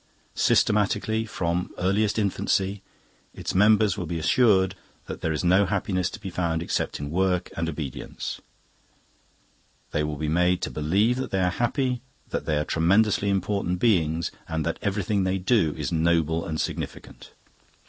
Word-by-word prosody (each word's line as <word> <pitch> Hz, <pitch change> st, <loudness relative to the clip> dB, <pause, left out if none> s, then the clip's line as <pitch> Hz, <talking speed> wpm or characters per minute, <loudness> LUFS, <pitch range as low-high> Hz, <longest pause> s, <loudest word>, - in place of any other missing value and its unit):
Systematically, 105 Hz, +2 st, +2 dB
from 85 Hz, -3 st, -2 dB
earliest 100 Hz, +4 st, +1 dB
infancy, 100 Hz, -1 st, 0 dB, 0.5 s
its -, -, -4 dB
members 105 Hz, 0 st, +4 dB
will 90 Hz, -, -4 dB
be 85 Hz, +1 st, -3 dB
assured 95 Hz, -, +3 dB, 0.3 s
that -, -, -7 dB
there 80 Hz, -, 0 dB
is 75 Hz, -, -2 dB
no 95 Hz, +3 st, +4 dB
happiness 95 Hz, -2 st, 0 dB
to -, -, -9 dB
be 95 Hz, -3 st, -6 dB
found 85 Hz, -2 st, -1 dB
except -, -, -2 dB
in 70 Hz, 0 st, -5 dB
work 90 Hz, 0 st, 0 dB
and 80 Hz, 0 st, -1 dB
obedience; 75 Hz, -5 st, -6 dB, 1.5 s
they 75 Hz, -, 0 dB
will 75 Hz, -1 st, -3 dB
be 75 Hz, +1 st, -3 dB
made 90 Hz, +3 st, +2 dB
to -, -, -2 dB
believe 100 Hz, +11 st, +1 dB
that 130 Hz, -, -3 dB
they 95 Hz, -, 0 dB
are 90 Hz, -, +2 dB
happy, 125 Hz, +3 st, -1 dB, 0.3 s
that -, -, -3 dB
they 75 Hz, -, +1 dB
are 75 Hz, -, 0 dB
tremendously 100 Hz, +5 st, +2 dB
important 95 Hz, -2 st, 0 dB
beings, 85 Hz, -6 st, +1 dB, 0.2 s
and 80 Hz, -1 st, -2 dB
that 85 Hz, -, -2 dB
everything 100 Hz, 0 st, 0 dB
they 95 Hz, +1 st, 0 dB
do 95 Hz, -5 st, +2 dB
is -, -, -3 dB
noble 80 Hz, 0 st, +1 dB
and 80 Hz, -1 st, -3 dB
significant. -, -, -5 dB
90 Hz, 160 wpm, -25 LUFS, 80-100 Hz, 1.5 s, members